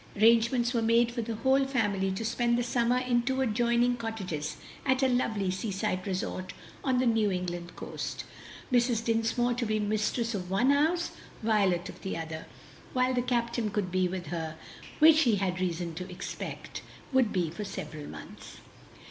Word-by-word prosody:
Arrangements 235 +3 +4
were 235 - +1
made 230 +1 +4
for 240 0 -2
the 225 0 -3
whole 265 +4 +3
family 205 -7 +1
to 190 +4 -3
spend 235 +1 +1
the 245 - +1
summer 240 0 +2
in 250 -1 +2
two 260 +2 -1
adjoining 240 0 +2
cottages 195 -10 -4 0.3
at 260 0 +2
a - - +5
lovely 220 -6 +1
seaside 190 -1 -2
resort 185 -1 -3 0.3
on 260 -2 +2
the 255 - +2
New 225 -3 +3
England 175 -2 -4
coast, - - -5 0.5
Mrs. 240 -2 +3
Dinsmore 230 +2 +1
to 245 +1 -2
be 215 -1 0
mistress 215 +3 0
of 180 -3 -4
one 200 +8 +3
house, 320 +5 +2 0.3
Violet 200 -6 +2
of - - -10
the 190 - -3
other, 160 -1 -6 0.5
while 255 0 +2
the 250 - +2
captain 235 -2 0
could 205 -3 -2
be 185 0 +2
with 180 -1 -4
her, 160 -1 -3 0.4
which 310 0 +7
he 240 -8 +4
had 185 -2 -1
reason 170 -2 -2
to 180 +3 -6
expect 180 - -6 0.3
would 255 -5 +4
be 175 -5 0
for 190 +6 -5
several 155 -6 -6
months. - - -10
225 Hz, 175 wpm, -29 LUFS, 185-245 Hz, 0.5 s, which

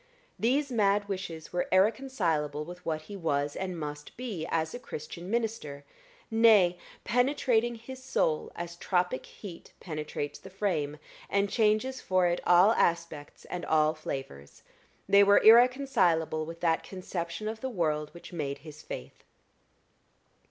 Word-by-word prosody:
These 275 +4 +1
mad 205 -3 +2
wishes 185 -5 -6
were 180 - 0
irreconcilable 185 - +1
with 180 +2 -10
what 155 -1 -2
he 200 +6 -9
was, 145 -5 -1
and 185 -3 -4
must 150 -1 -7
be, 210 -10 -4
as 160 -1 -1
a 245 - -5
Christian 170 -3 -8
minister, 220 -11 -2 0.5
nay, 215 -6 +5 0.2
penetrating 245 -2 +2
his 255 +3 -10
soul 160 -11 0
as 170 0 -6
tropic 180 -6 -1
heat 180 -5 -11
penetrates 150 -3 -5
the 190 - -12
frame, 170 -7 -2 0.3
and 200 0 +1
changes 225 +4 +1
for 185 -1 +2
it 175 0 +1
all 180 +4 +7
aspects 170 -7 -1
and 180 - -5
all 155 0 +3
flavors, 135 - -7 0.4
they 200 0 +7
were 200 0 +6
irreconcilable 220 - +4
with 165 0 -9
that 165 -2 +2
conception 185 +1 -5
of 220 0 -5
the 265 - -2
world 155 -8 -1
which 170 +1 -12
made 140 -4 -3
his 155 0 -10
faith. 60 - -9
180 Hz, 140 wpm, -29 LUFS, 155-220 Hz, 0.5 s, all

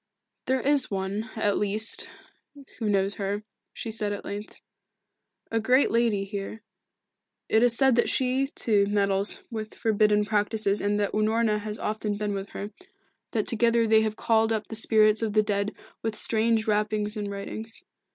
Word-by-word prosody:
"There 260 0 +1
is 285 0 +3
one, 200 +3 -3
at 205 -2 0
least, 210 +2 +3 0.7
who 220 -3 -1
knows 195 0 +1
her," 200 +2 -2 0.3
she 225 - -6
said 210 -2 -1
at 205 - -6
length. 205 +1 -7 0.9
"A 225 - +1
great 255 +5 +3
lady 230 -4 +1
here 200 +2 -6 0.8
it 220 - +3
is 240 -1 +4
said 265 -2 +4
that 235 - +3
she, 260 +1 +1
too, 210 -7 +1
meddles 200 -1 0
with 220 -1 -6
forbidden 210 -2 +2
practices 210 -1 0
and 205 +1 0
that 205 -1 0
Unorna 215 0 +1
has 210 0 -5
often 210 -1 -3
been 210 -1 -2
with 195 0 -5
her 205 +1 -6 0.6
that 215 -3 0
together 230 0 +2
they 220 0 +4
have 215 -1 -1
called 225 0 +1
up 220 -1 -2
the 225 - -5
spirits 215 -1 +4
of 220 -2 -1
the 215 0 +4
dead 205 0 -1 0.3
with 225 -1 -2
strange 225 0 +2
rappings 210 0 +1
and 205 -1 -4
writings. 220 +3 -6
215 Hz, 165 wpm, -26 LUFS, 205-225 Hz, 0.9 s, is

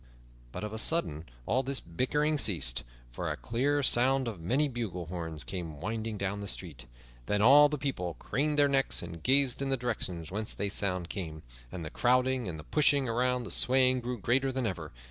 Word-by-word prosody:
But - - -6
of 105 0 -4
a 110 - -4
sudden 85 - +1 0.2
all 130 - +2
this 135 0 0
bickering 150 - 0
ceased, 80 - 0 0.3
for - - -4
a - - -3
clear 140 +5 0
sound 130 +1 +3
of 105 -7 -5
many 130 - +1
bugle 110 -9 -4
horns 80 -2 -5
came 85 -6 -6
winding 110 +4 -3
down 100 +1 -2
the 100 - -5
street. 75 -11 -6 0.4
Then 105 - +1
all 140 +7 +7
the 150 - -2
people 110 - -3
craned 150 +2 -1
their 145 -1 +5
necks 135 -7 +1
and 85 -1 -8
gazed 135 - +3
in 135 - -1
the 135 - +1
direction 105 -9 -3
whence 105 +3 -2
the 100 - -2
sound 90 -3 +1
came, 80 -5 -6 0.3
and 85 -3 -6
the 80 - -6
crowding 125 -1 +2
and 85 -3 -5
the 75 - -9
pushing 145 - +3
and 125 +1 0
the - - -6
swaying 130 0 +3
grew 125 +1 -4
greater 135 +5 +1
than 130 -1 -2
ever. 85 -7 -4
115 Hz, 200 wpm, -30 LUFS, 90-135 Hz, 0.4 s, all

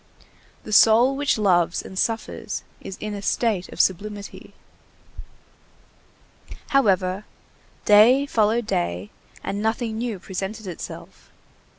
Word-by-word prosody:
The 215 - -6
soul 230 +5 +6
which 285 -2 +1
loves 175 -5 +2
and - - -10
suffers 225 +4 -3 0.2
is 190 - -8
in 215 0 -5
a 200 - -5
state 205 -3 0
of - - -11
sublimity. 200 +2 -2 2.1
However, 195 -7 +2 0.6
day 230 +7 +6
followed 225 -2 +1
day, 85 - -2 0.3
and 200 +1 -3
nothing 220 0 -1
new 235 -3 -3
presented 195 +4 -6
itself. 180 -3 -9
210 Hz, 105 wpm, -23 LUFS, 190-225 Hz, 2.1 s, soul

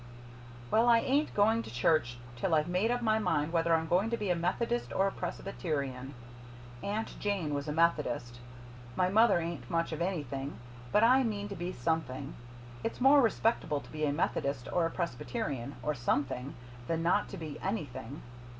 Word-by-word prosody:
"Well, 230 +2 +4
I 235 - +7
ain't 280 +6 +1
going 220 +3 +4
to - - -9
church 120 0 +2 0.2
till 160 +7 +1
I've 155 +1 +2
made 180 +5 +1
up 245 0 0
my 220 -1 +3
mind 155 -6 0
whether 165 0 +3
I'm 160 0 0
going 185 +6 +2
to 235 - -1
be 205 -4 -1
a - - +3
Methodist 230 +8 -1
or 195 - +2
a 195 - +1
Presbyterian. 140 -11 -4 0.7
Aunt 215 +2 -3
Jane 195 -8 -1
was 140 +1 -2
a - - -1
Methodist. 150 -7 +1 0.6
My 180 0 +2
mother 220 +1 +5
ain't 165 -8 -5
much 165 0 0
of 160 +1 -4
anything 145 -6 -3 0.3
but 210 - +4
I 255 +3 +6
mean 205 -3 -2
to 200 - -5
be 175 +1 -3
something. 140 -1 -2 0.5
It's 225 - -3
more 275 +3 +7
respectable 225 - +1
to - - -14
be 155 0 -4
a 145 - +1
Methodist 140 -4 -1
or 170 -2 +3
a - - -4
Presbyterian, 140 -4 -3
or 150 - 0
SOMETHING, 130 +1 -1 0.3
than 165 0 -1
not 180 +5 +2
to 195 - -7
be 155 -3 -6
anything. 145 - -4
165 Hz, 180 wpm, -31 LUFS, 145-205 Hz, 0.7 s, I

